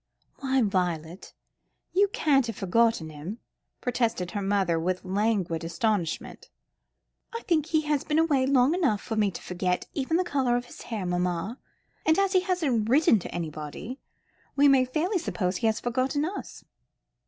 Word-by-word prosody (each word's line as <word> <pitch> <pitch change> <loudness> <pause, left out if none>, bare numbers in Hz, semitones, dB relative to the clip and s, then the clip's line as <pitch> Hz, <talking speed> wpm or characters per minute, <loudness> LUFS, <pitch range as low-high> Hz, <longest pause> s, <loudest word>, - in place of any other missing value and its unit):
"Why 265 -2 +1
Violet, 180 -3 -2 0.6
you 400 +2 +4
can't 280 -9 +2
have 230 - -4
forgotten 195 -4 +1
him," 155 +9 -7 0.4
protested 230 -7 -1
her 205 - -3
mother, 195 -4 +1
with 180 +3 -2
languid 190 -4 0
astonishment. 170 0 -2 0.9
"I 465 - -3
think 320 -7 +1
he 315 -2 +2
has 300 -2 0
been 300 - 0
away 290 -5 +3
long 270 +1 +4
enough 305 - +1
for 225 - -5
me 210 -2 +2
to 190 - -8
forget 180 0 -1
even 290 +4 0
the 365 - +2
colour 265 -7 +1
of 245 - -4
his - - -12
hair, 220 -5 -4
mamma; 180 +5 -1 0.4
and 315 - +3
as 395 0 +2
he 370 - +6
hasn't 315 - 0
written 265 -4 +5
to - - -8
anybody, 160 - -6 0.6
we 285 +1 +5
may 270 -2 +5
fairly 335 +10 0
suppose 185 - -2
he 225 - +1
has 220 0 +1
forgotten 260 +4 0
us." 380 +5 -7
230 Hz, 165 wpm, -27 LUFS, 185-285 Hz, 0.9 s, he